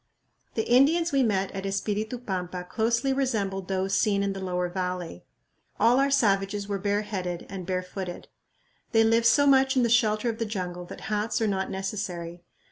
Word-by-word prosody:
The 220 - -1
Indians 310 +7 +4
we 275 -1 +3
met 195 -5 +1
at 195 - -5
Espiritu 210 +4 -2
Pampa 185 -5 -4
closely 230 +7 0
resembled 205 -8 -1
those 190 0 -1
seen 200 -1 +2
in 200 0 -1
the 195 -1 -6
lower 180 -1 -1
valley. 180 - -4 0.6
All 240 +3 +5
our 275 +1 +3
savages 200 -6 +1
were 200 -1 -2
bareheaded 200 -3 -2
and 185 -3 -7
barefooted. 185 -1 -4 0.7
They 225 0 +5
live 230 +1 +4
so 285 +4 +5
much 265 -1 +4
in 250 - +4
the 235 - +2
shelter 220 -1 +3
of 225 -1 -2
the 230 - 0
jungle 180 -4 -4
that - - -10
hats 210 +1 -1
are 225 - +1
not 195 -1 -1
necessary. 185 -3 -4
200 Hz, 175 wpm, -27 LUFS, 185-230 Hz, 0.7 s, All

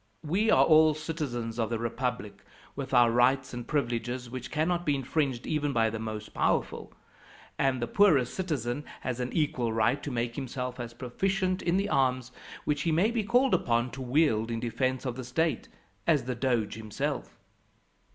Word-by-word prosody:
We 195 +9 +1
are - - +6
all 155 -1 +6
citizens 135 -8 -4
of 115 - 0
the 115 - -1
republic, 115 -2 -3 0.3
with 140 -1 -5
our 120 -2 +5
rights 130 +3 +2
and 120 -1 -6
privileges, 125 -3 -2
which 130 -1 -6
cannot 170 +3 0
be 145 -4 +1
infringed 135 -2 -1
even 145 -2 -1
by 115 -2 +2
the 110 - -4
most 110 -1 -6
powerful; - - 0 0.7
and 135 -2 +2
the 120 - -1
poorest 140 - +3
citizen 145 -8 -2 0.2
has 125 -1 -3
an 125 0 -2
equal 130 -7 0
right 115 +5 +1
to - - -5
make 120 -2 -2
himself 125 -2 -4
as 120 -1 -6
proficient 185 - -1
in 175 +1 +1
the 200 +1 0
arms, 130 -3 +1 0.3
which 145 -1 0
he 165 - +1
may 180 +8 +3
be 230 -2 0
called 245 +5 +3
upon 120 +1 +1
to 130 +3 -7
wield 125 -4 +2
in 115 -1 -2
defence 130 +3 -1
of 125 -1 -3
the 130 - -5
state, 140 +2 -1 0.4
as 150 -6 +3
the 125 +1 -2
Doge 120 -4 0
himself. 110 -1 -4
130 Hz, 180 wpm, -29 LUFS, 120-155 Hz, 0.7 s, are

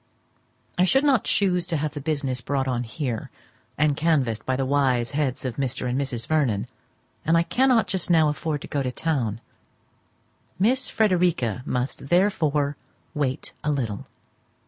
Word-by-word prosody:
I - - +6
should 270 +9 +4
not 270 -7 +3
chuse 180 -3 +1
to 165 - 0
have 150 0 -1
the 145 - -5
business 135 -4 -1
brought 135 +1 -1
on 125 -1 -1
here, 115 0 -4 0.5
and 150 -1 +3
canvassed 140 -8 +1
by 130 - +1
the 135 +1 0
wise 130 -3 +1
heads 140 -3 -1
of 125 - -3
Mr. 130 -2 -2
and 125 - -1
Mrs. 125 -4 -3
Vernon; 125 -10 +1 0.6
and 165 +1 +3
I 165 - +4
cannot 245 +2 +3
just 190 -2 -2
now 160 -3 +5
afford 150 0 -2
to - - -7
go 145 - -1
to 130 -2 -1
town. 125 -8 -1 1.2
Miss 245 +7 +2
Frederica 175 - +1
must 125 +2 -2
therefore 155 -6 +2 0.4
wait 135 -3 -2
a 150 - 0
little. 115 -8 -3
145 Hz, 160 wpm, -25 LUFS, 130-165 Hz, 1.2 s, I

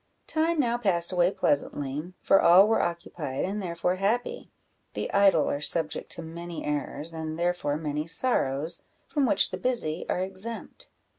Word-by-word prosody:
Time 320 +1 0
now 240 -3 +1
passed 180 -6 +1
away 175 -1 +3
pleasantly, 145 -1 -1
for 195 - +5
all 180 +4 +7
were 225 - +3
occupied, 165 -5 -3
and 205 +3 -3
therefore 180 0 -1
happy: 220 +6 -1 0.5
the - - -3
idle 195 -5 +5
are 145 - -1
subject 155 0 0
to 170 - -2
many 170 +1 -7
errors, 150 +2 -3
and 160 -1 -5
therefore 170 -4 0
many 150 0 -3
sorrows, 165 - 0 0.2
from 285 -3 0
which 200 - +4
the 185 - -3
busy 180 -7 -1
are 180 - 0
exempt. 195 +5 -6
175 Hz, 155 wpm, -27 LUFS, 155-200 Hz, 0.5 s, all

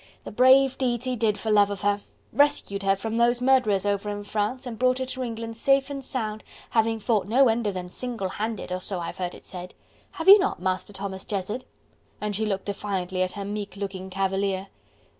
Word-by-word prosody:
"The - - -7
brave 260 +3 +5
deeds 245 -2 0
he 255 -1 0
did 215 -2 +1
for 220 - -2
love 205 -1 +5
of 200 -2 -5
her! 205 0 +1 0.3
Rescued 285 -9 +2
her 195 0 +3
from 225 +3 -3
those 240 +1 +3
murderers 245 -7 +3
over 205 0 0
in 205 0 -4
France 215 +6 -2
and 230 -3 -6
brought 255 0 +3
her 260 - -2
to 260 0 -6
England 230 -2 -5
safe 275 +3 +2
and 275 -1 -5
sound, 215 -5 -3 0.3
having 225 0 +2
fought 215 -3 +1
no 255 +4 +5
end 225 0 +1
of 200 - -2
them 180 -1 -4
single 225 0 -4
handed, 215 -1 -4
so 190 -1 -3
I've 170 - -5
heard 180 -1 -3
it - - -15
said. 180 -1 -8 0.4
Have 325 - -5
you 400 +2 +11
not, 395 - 0
Master 185 +2 -2
Thomas 195 -1 -5
Jezzard?" 210 +5 -3 0.5
And 210 -1 -2
she 220 +2 0
looked 195 -2 -2
defiantly 190 -2 -2
at 185 0 0
her 200 -1 -5
meek 205 -1 -5
looking 195 -1 -5
cavalier. 195 0 -1
210 Hz, 210 wpm, -26 LUFS, 195-245 Hz, 0.5 s, you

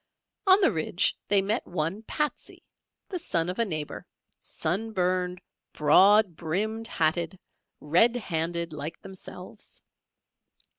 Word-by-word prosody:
On 380 +1 +7
the 375 - +4
ridge 170 +2 +1
they 200 -1 +4
met 215 +5 -1
one 175 +4 -2
"Patsey," 300 +6 -4 0.5
the 365 - -3
son 170 - -1
of 185 - -4
a 230 - +3
neighbour, 155 -6 -5 0.3
sun 210 +8 -3
burned, 180 -1 0 0.3
broad 190 +5 +5
brimmed 215 +8 -2
hatted, 165 0 0 0.4
red 180 +11 +4
handed, 170 -5 -2
like 155 +2 -6
themselves. 190 +1 -11
180 Hz, 115 wpm, -27 LUFS, 165-215 Hz, 0.5 s, On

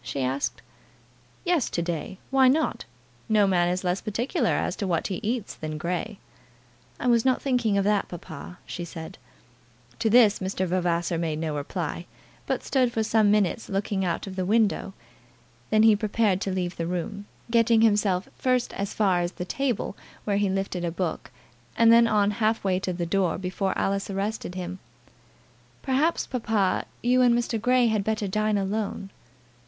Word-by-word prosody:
she 135 +2 -3
asked. 130 -2 -2 0.8
"Yes, 345 -7 +1
to - - -2
day. 170 +2 -4
Why 265 -1 +5
not? 300 +5 +1 0.4
No 215 -2 +4
man 175 -2 +2
is 180 +1 -2
less 180 +1 0
particular 230 +4 -1
as - - 0
to 200 - -2
what 170 -3 0
he 190 - -2
eats 225 -1 -2
than 155 -1 -5
Grey." 180 +6 -3 0.8
"I - - -4
was 235 -2 +4
not 260 -1 +2
thinking 245 -6 +1
of 200 - +2
that, 205 0 +1
papa," 175 0 -9
she 175 - -6
said. 165 -1 -8 0.8
To 230 -1 +1
this 220 -2 +5
Mr. 190 0 -2
Vavasor 175 -2 0
made 160 -2 -1
no 155 -1 -2
reply, 165 +3 -4 0.4
but - - -1
stood 255 -3 +1
for 225 -2 0
some 215 -1 +3
minutes 210 +1 +1
looking 195 -1 -1
out 175 -2 -1
of 190 -1 -7
the 185 - -1
window. 205 -1 +1 0.7
Then 215 0 +4
he 220 -1 +7
prepared 205 -2 +1
to 195 - -1
leave 180 -1 -2
the 165 - -2
room, 200 +4 -4 0.2
getting 230 -1 +4
himself 205 -4 +2
first 255 -1 0
as 200 0 -4
far 190 -4 +2
as 175 +1 -2
the 180 - -5
table, 250 -2 -2 0.3
where 200 -1 0
he 205 -1 +1
lifted 190 -2 -2
a 170 - 0
book, 170 -1 -3 0.5
and 230 0 +6
then 235 0 +6
on 210 -2 +2
half 220 +1 0
way 185 -2 +1
to 190 - -2
the 175 -1 -3
door 180 -1 +1
before 190 +1 -2
Alice 195 +1 -1
arrested 195 -1 -3
him. 185 0 -5 1.0
"Perhaps, 285 +5 +1
papa, 220 -6 0 0.2
you 250 +1 +4
and 240 -1 +5
Mr. 235 -2 -1
Grey 250 +1 +3
had 220 -3 +1
better 215 -1 -1
dine 215 +2 +1
alone." 200 0 -3
200 Hz, 175 wpm, -26 LUFS, 180-225 Hz, 1.0 s, he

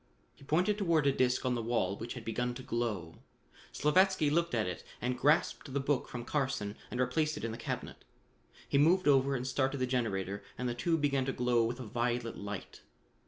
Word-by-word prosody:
He - - -18
pointed 180 +9 +1
toward 165 -6 +2
a 140 - +5
disc 130 -1 +1
on 125 - +2
the 120 - -1
wall 110 -5 0
which 115 +4 -6
had 125 - -8
begun 120 +2 -1
to 130 - -8
glow. 110 -10 -3 0.5
Slavatsky 180 0 +3
looked 170 -3 +1
at 110 - +1
it 90 -2 -5 0.2
and 125 +1 -1
grasped 145 +1 +2
the - - +2
book 135 -1 0
from 120 -1 -6
Carson 130 -9 -1
and 125 - -4
replaced 150 +5 +1
it - - -7
in 115 - -2
the - - -5
cabinet. - - -5 0.6
He 140 - +2
moved 175 +5 +4
over 135 -1 +4
and 125 -1 -3
started 135 +1 0
the 130 - +1
generator 100 -6 -1 0.2
and 125 - -2
the 120 - -1
tube 165 +6 0
began 140 -2 +1
to 135 - -1
glow 125 -1 +2
with 120 +2 -3
a 125 - -6
violet 120 +1 -1
light. 100 -1 -7
125 Hz, 210 wpm, -32 LUFS, 120-145 Hz, 0.6 s, a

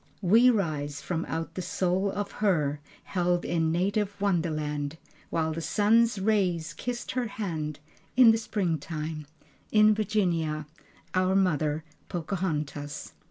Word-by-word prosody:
We 225 +7 +6
rise 150 - -1
from 165 +4 -3
out 165 0 -4
the 185 - -4
soul 185 +2 0
of 205 0 -3
her 155 -9 +1 0.2
Held 175 -1 0
in 160 -2 +1
native 200 +4 0
wonderland, 155 -6 -1 0.3
While 160 -1 0
the 165 - -4
sun's 215 +7 +3
rays 185 -6 +1
kissed 245 +4 -4
her 250 -2 -1
hand, 160 -8 -4 0.4
In 245 -3 +9
the 225 - +2
springtime, 160 -7 -3 0.4
In 215 0 +6
Virginia, 175 -8 0 0.5
Our 185 +1 +2
Mother, 155 -5 +1 0.3
Pocahontas. 155 -5 -3
175 Hz, 120 wpm, -28 LUFS, 155-205 Hz, 0.5 s, In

